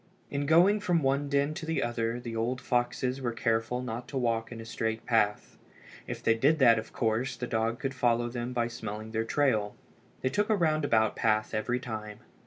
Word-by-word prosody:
In 140 0 -2
going 180 +7 +5
from 175 -6 +1
one 140 +1 +1
den 140 +1 +1
to 170 +1 -7
the 160 0 -1
other 120 0 -1
the 120 -2 -6
old 120 +3 -1
foxes 125 +2 -1
were 120 -2 -1
careful 115 +2 0
not 120 0 -5
to 135 0 -4
walk 115 -2 0
in 115 - -7
a 115 - -8
straight 110 0 -3
path. 105 -3 0 0.5
If - - -6
they 115 - +4
did 140 +8 +3
that 120 -5 +6
of 110 - -9
course 115 +3 0
the 125 - -4
dog 115 0 -1
could 135 +1 -3
follow 120 -2 +1
them 120 0 -4
by 120 -2 0
smelling 110 -1 -6
their 110 0 -1
trail. 110 -6 +1 0.5
They 130 - +1
took 205 +10 0
a 215 - +4
roundabout 155 - +2
path 110 -1 +1
every 120 +3 0
time. 110 -4 -6
120 Hz, 200 wpm, -29 LUFS, 115-135 Hz, 0.5 s, that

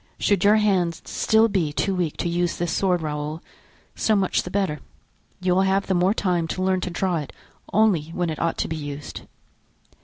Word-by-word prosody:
Should 200 -3 +1
your 205 +1 +6
hand 190 -6 +1
still 220 +1 +3
be 185 -8 0
too 195 +6 -1
weak 175 -5 -2
to - - -2
use 175 0 0
this 175 -1 -1
sword, 180 -1 +1
Raoul, 150 +1 -3 0.6
so 220 - +2
much 195 -2 +1
the - - -7
better. 190 -6 -1 0.6
You 185 -1 +1
will 185 - +3
have 195 +1 +2
the 190 - 0
more 185 +3 +2
time 175 -6 0
to 185 +3 -3
learn 185 -1 +1
to 180 - -3
draw 180 0 -1
it 150 -3 -5 0.4
only 205 -7 +3
when 170 0 -2
it 155 - -5
ought 165 -1 0
to - - -1
be 160 - -4
used." 145 -1 -7
180 Hz, 205 wpm, -23 LUFS, 165-195 Hz, 0.6 s, your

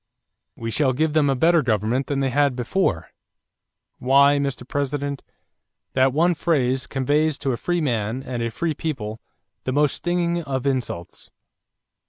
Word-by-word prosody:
'We 115 0 -5
shall 135 +1 +2
give 155 +3 0
them 150 -2 +3
a 135 - +2
better 165 +5 +4
government 115 +2 0
than 140 -1 -1
they 135 -1 0
had 140 0 +2
before.' 120 - -1 0.9
Why, 140 +2 +5
Mr. 140 -3 -3
President, 140 0 -2 0.7
that 130 0 +3
one 170 +6 +3
phrase 135 -5 0
conveys 145 +3 +1
to 140 -2 -1
a - - 0
free 175 +5 -1
man 120 -2 -1
and 125 -3 -4
a 115 - -1
free 155 +9 -2
people 115 -10 -4 0.4
the 130 - -2
most 145 +1 +2
stinging 175 -1 -1
of 135 -4 -3
insults. 125 -11 -3
140 Hz, 155 wpm, -23 LUFS, 125-150 Hz, 0.9 s, Why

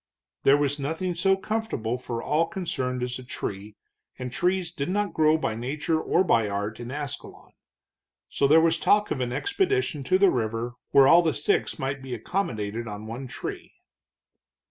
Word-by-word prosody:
There 140 +1 +5
was 145 0 0
nothing 160 +6 -2
so 190 +3 +2
comfortable 190 - -2
for 120 -2 -5
all 160 +2 +1
concerned 130 -11 -3
as 125 +1 -3
a - - -9
tree, 105 -3 -6 0.4
and 125 -1 -5
trees 180 +1 0
did 145 -3 -4
not 205 +2 0
grow 155 0 +4
by 155 - -1
nature 145 +7 -1
or 185 - +2
by 115 - +2
art 105 +2 -3
in 120 0 -6
Ascalon. 145 0 -6 0.8
So 140 - +1
there 155 +3 +7
was 165 0 +2
talk 210 0 +3
of - - -1
an 125 -1 -1
expedition 395 - 0
to 185 - +3
the 195 -1 +5
river, 115 0 -2 0.2
where 135 -1 +6
all 170 +4 +8
the 160 -3 0
six 145 - 0
might 135 +1 -3
be 130 -2 -5
accommodated 115 - -3
on 105 0 -7
one 120 +4 -6
tree. - - -7
140 Hz, 175 wpm, -26 LUFS, 120-175 Hz, 0.8 s, all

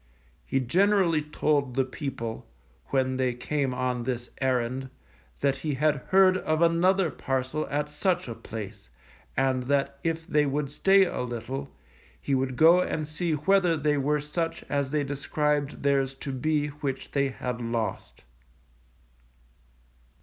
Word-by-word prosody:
He 135 - +1
generally 180 - +3
told 145 -3 0
the 135 -1 +2
people, 130 - -5 0.4
when 130 -1 0
they 130 -2 0
came 140 +2 -1
on 125 -1 -1
this 120 0 -4
errand, 130 0 0 0.5
that 140 -1 +2
he 145 +1 -2
had 150 +2 +2
heard 190 -1 +5
of 155 -3 0
another 170 +1 +3
parcel 130 +3 -2
at 150 +1 -2
such 175 +3 0
a 115 - -4
place, 110 - -8 0.5
and 130 -1 +2
that 140 +1 0
if 165 0 -1
they 150 -4 +2
would 140 0 -2
stay 195 +5 +5
a 175 - -3
little, 125 +3 -4 0.5
he 140 - -2
would 130 -1 0
go 165 +6 +7
and 155 -4 -2
see 160 +2 -2
whether 175 +2 +3
they 150 0 +1
were 150 +2 +1
such 165 +3 -3
as 140 -1 0
they 150 +1 0
described 145 +1 -1
theirs 135 -1 +1
to 135 +1 -6
be 150 +2 0
which 140 -2 -5
they 140 -1 +2
had 125 -2 -4
lost. 115 -1 -3
140 Hz, 145 wpm, -27 LUFS, 130-155 Hz, 0.5 s, go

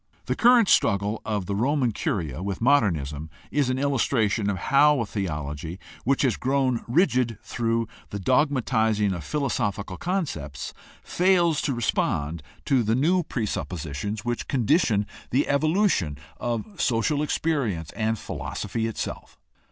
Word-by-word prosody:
The - - -1
current 240 -3 +5
struggle 100 - +2
of 105 -4 -2
the 100 - -3
Roman 130 +2 +1
Curia 90 - -2
with 95 -1 -3
Modernism 80 - +1 0.2
is 140 -2 +1
an 130 - 0
illustration 115 -6 +1
of 100 - -1
how 140 +8 +4
a 115 - 0
theology 80 -4 -4 0.3
which 135 +3 +2
has 130 -4 +2
grown 130 -2 +1
rigid 125 - +2
through 115 -1 -1 0.2
the 100 - -4
dogmatizing 110 -4 +2
of 85 -4 -5
philosophical 105 - -2
concepts 145 - -3 0.3
fails 175 -4 +2
to 135 - -1
respond 85 -8 -1 0.2
to 135 -3 +3
the 110 0 +1
new 170 +8 +3
presup 120 - -3
positions 90 +7 -4
which 120 0 -2
condition 120 - +2 0.2
the 135 +4 +1
evolution 155 - +2 0.2
of 120 - -3
social 130 +5 +1
experience 135 - -1
and 110 0 -1
philosophy 110 +2 -4
itself. 115 - -6
115 Hz, 135 wpm, -25 LUFS, 100-140 Hz, 0.3 s, current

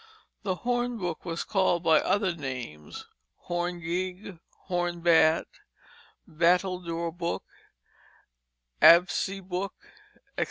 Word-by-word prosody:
The 190 -3 -1
hornbook 240 -8 -2
was 170 -1 -3
called 185 -4 +1
by 160 -2 +5
other 200 -3 +1
names, 125 - -7 0.4
horn 175 0 -3
gig, 180 +2 -4 0.2
horn 175 -2 -2
bat, 165 -1 +4 0.8
battledore 170 0 0
book, 170 -1 -3 1.4
absey 185 +2 +5
book, 190 +2 -3 0.6
etc. - - -5
175 Hz, 90 wpm, -27 LUFS, 165-185 Hz, 1.4 s, by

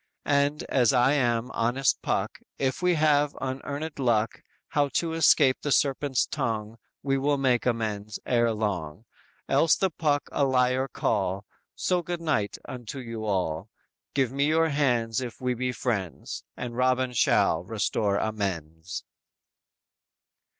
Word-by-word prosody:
And, 145 +1 +1
as 125 -3 +2
I 125 +2 +4
am 120 -3 +1
honest 120 +3 +1
Puck, - - -1 0.2
If 135 +3 -1
we 180 -1 +3
have 150 -2 +2
unearned 140 +4 -4
luck, 115 -4 +1 0.3
How 145 -1 +2
to 165 -1 0
escape 150 -4 +4
the 145 - -2
serpent's 135 -1 +2
tongue, 115 -6 -3 0.3
We 135 0 +1
will 145 +1 +1
make 125 -3 +1
amends 110 -3 -2
ere 120 -2 +2
long; 105 -4 -3 0.4
Else 165 - +4
the 190 -2 0
Puck 145 -3 +1
a 145 - +1
liar 130 0 +2
call, 100 -5 -1 0.3
So 180 -1 +1
good 175 0 -4
night 150 -12 -1
unto 125 +1 -7
you 115 -4 -6
all, 90 -2 -1 0.5
Give 135 -4 +2
me 140 +2 +1
your 160 +1 +3
hands 125 -5 +1
if 125 -2 -6
we 125 -1 0
be 125 +1 -2
friends, 105 -9 -3
And 120 -1 -5
Robin 130 0 +1
shall 85 -7 +3
restore 105 0 0
amends!" 90 -6 -3
125 Hz, 140 wpm, -27 LUFS, 110-140 Hz, 0.5 s, I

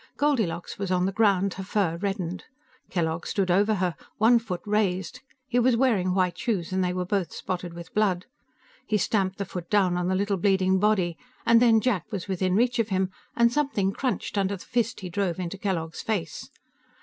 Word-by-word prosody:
Goldilocks 220 - 0
was 195 -2 -2
on 180 -1 +2
the 195 - 0
ground, 200 -2 +2
her 190 - -6
fur 190 -4 0
reddened. 185 -2 -3 0.4
Kellogg 165 -2 -1
stood 190 -3 0
over 205 +4 +3
her, 180 -3 -1 0.2
one 235 +3 +5
foot 195 -6 -5
raised. 195 -4 0 0.3
He 245 -1 +1
was 245 -1 +3
wearing 205 -8 +2
white 185 -2 +1
shoes, 205 -9 -1
and 185 0 +1
they 180 - 0
were 180 0 -2
both 190 -1 -1
spotted 175 -2 -5
with 170 0 -10
blood. 195 -4 +1 0.6
He 215 - +2
stamped 195 -2 0
the 200 - -3
foot 175 -3 -7
down 190 -4 +3
on 180 0 -1
the 190 - +1
little 200 +1 0
bleeding 190 -1 +2
body, 190 -5 +1 0.3
and 230 0 +6
then 230 -2 +6
Jack 215 -5 -1
was 195 -3 -4
within 185 -1 0
reach 245 +2 +2
of 225 -1 +1
him, 190 -1 0 0.2
and 235 0 +4
something 270 -10 +1
crunched 250 -5 -2
under 195 0 0
the - - -13
fist 235 -2 -1
he 185 - -5
drove 190 -2 -1
into 185 +2 -4
Kellogg's 165 -5 -2
face. 180 -8 -3
195 Hz, 195 wpm, -26 LUFS, 180-215 Hz, 0.6 s, and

